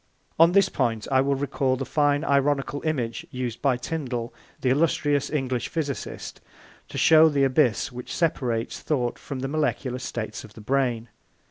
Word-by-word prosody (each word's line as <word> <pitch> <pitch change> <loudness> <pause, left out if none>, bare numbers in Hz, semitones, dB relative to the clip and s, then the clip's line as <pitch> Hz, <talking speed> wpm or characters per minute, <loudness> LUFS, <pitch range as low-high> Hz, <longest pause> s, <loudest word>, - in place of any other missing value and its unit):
On 165 +2 +6
this 195 -1 +5
point 115 - -1
I 130 -1 +4
will 140 +1 +1
recall 135 -1 0
the 135 +1 -4
fine 145 0 +1
ironical 140 -1 +1
image 125 -8 -2
used 125 -2 -4
by 135 -3 +2
Tyndall, 125 -4 -4 0.3
the 130 - +2
illustrious 145 -1 +1
English 130 -5 -1
physicist, 145 -4 -5 0.5
to - - -6
show 160 0 +7
the 140 -2 +1
abyss 130 -2 +2
which 125 0 -8
separates 125 -9 -1
thought 125 -6 -1
from 135 -3 -6
the 135 - -2
molecular 140 -3 -1
states 115 -3 -5
of 110 - -13
the - - -11
brain. 120 -1 0
135 Hz, 160 wpm, -25 LUFS, 125-145 Hz, 0.5 s, show